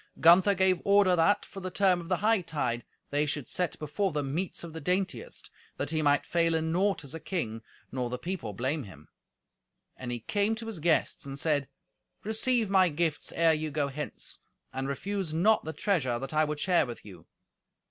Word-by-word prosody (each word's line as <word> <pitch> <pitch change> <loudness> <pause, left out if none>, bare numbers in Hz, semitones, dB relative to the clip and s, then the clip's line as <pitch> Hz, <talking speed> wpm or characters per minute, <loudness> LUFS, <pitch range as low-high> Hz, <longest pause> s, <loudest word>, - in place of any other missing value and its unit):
Gunther 185 +4 +6
gave 190 -1 +3
order 200 -2 +5
that, 175 +5 +3
for 195 - -9
the 185 -1 -4
term 185 -2 +2
of 170 - -10
the 185 - +2
hightide, 160 - +1 0.3
they 145 +1 +1
should 145 -4 -3
set 180 -2 -1
before 155 +6 -1
them 145 -3 -2
meats 180 +3 -2
of 165 -2 -8
the 160 - -6
daintiest, 190 - -2 0.3
that - - -2
he 155 -1 0
might 145 -1 +3
fail 165 -1 +2
in 160 0 0
naught 195 +1 +1
as 140 - -9
a 165 - -5
king, 115 - -3 0.3
nor 125 -2 -2
the 125 - -3
people 150 - -4
blame 130 +9 -1
him. 75 -6 -14 0.9
And 125 -1 -6
he 120 - -3
came 205 - 0
to 225 +1 -7
his 225 -6 -5
guests, 160 +1 +1
and 135 0 -6
said, 145 -2 +1 0.6
"Receive 220 +2 +1
my 190 -2 +4
gifts 160 -1 -1
ere 165 -1 +4
you 155 0 -2
go 145 -1 -1
hence, 150 +2 -5 0.3
and 135 +1 -3
refuse 180 +4 -3
not 210 +7 +3
the 160 - -3
treasure 150 - 0
that 135 +4 -6
I 155 0 +3
would 150 0 -3
share 175 -4 +3
with 120 -3 -8
you." 90 -6 -13
160 Hz, 200 wpm, -29 LUFS, 140-190 Hz, 0.9 s, Gunther